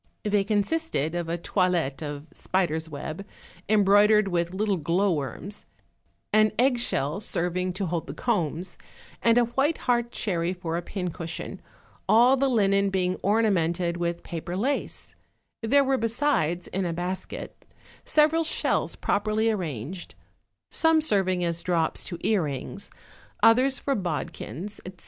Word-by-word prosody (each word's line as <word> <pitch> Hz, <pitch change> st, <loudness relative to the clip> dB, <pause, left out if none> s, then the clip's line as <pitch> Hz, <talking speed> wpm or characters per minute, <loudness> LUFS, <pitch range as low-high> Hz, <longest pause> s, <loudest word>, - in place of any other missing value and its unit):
They 205 Hz, -1 st, +2 dB
consisted 205 Hz, -, 0 dB
of 175 Hz, -1 st, -3 dB
a 170 Hz, -, -1 dB
toilet 175 Hz, -6 st, 0 dB
of 145 Hz, -1 st, -5 dB
spider's 160 Hz, -4 st, -1 dB
web, 155 Hz, +4 st, -6 dB, 0.5 s
embroid 205 Hz, 0 st, +5 dB
ered 215 Hz, -1 st, +4 dB
with 170 Hz, -1 st, 0 dB
little 200 Hz, +1 st, 0 dB
glowworms, 175 Hz, +2 st, -1 dB, 0.7 s
an 215 Hz, 0 st, +4 dB
egg 250 Hz, 0 st, +3 dB
shell 150 Hz, -, -1 dB
serving 180 Hz, -2 st, -1 dB
to 195 Hz, +1 st, -2 dB
hold 170 Hz, -1 st, -3 dB
the -, -, -6 dB
combs, 175 Hz, -, -1 dB, 0.4 s
and 230 Hz, 0 st, +4 dB
a 245 Hz, -, +6 dB
white 270 Hz, +7 st, +1 dB
heart 240 Hz, -1 st, +1 dB
cherry 175 Hz, -6 st, -1 dB
for 175 Hz, -3 st, -4 dB
a 170 Hz, -, -1 dB
pincushion, 175 Hz, -3 st, -5 dB, 0.5 s
all 245 Hz, +4 st, +6 dB
the 270 Hz, 0 st, +1 dB
linen 200 Hz, -4 st, +3 dB
being 185 Hz, -1 st, 0 dB
ornamented 180 Hz, -5 st, +1 dB
with 170 Hz, 0 st, -2 dB
paper 175 Hz, +2 st, -5 dB
lace; 270 Hz, +8 st, -2 dB, 0.5 s
there 275 Hz, +5 st, +4 dB
were 265 Hz, -1 st, +1 dB
besides, 230 Hz, -, 0 dB
in 195 Hz, -, -3 dB
a 170 Hz, -2 st, -1 dB
basket, 180 Hz, +2 st, -5 dB, 0.4 s
several 310 Hz, +2 st, +3 dB
shells 320 Hz, -, 0 dB
properly 215 Hz, +2 st, +1 dB
arranged, 170 Hz, -, -5 dB, 0.6 s
some 325 Hz, -1 st, +4 dB
serving 190 Hz, -, +1 dB
as 170 Hz, -1 st, -1 dB
drops 170 Hz, -3 st, 0 dB
to 175 Hz, -, -5 dB
earrings, 175 Hz, -, -2 dB, 0.5 s
others 260 Hz, +4 st, +5 dB
for 280 Hz, -, -1 dB
bodkins, 180 Hz, -, -4 dB
etc. 185 Hz, -1 st, -10 dB
190 Hz, 135 wpm, -26 LUFS, 170-220 Hz, 0.7 s, a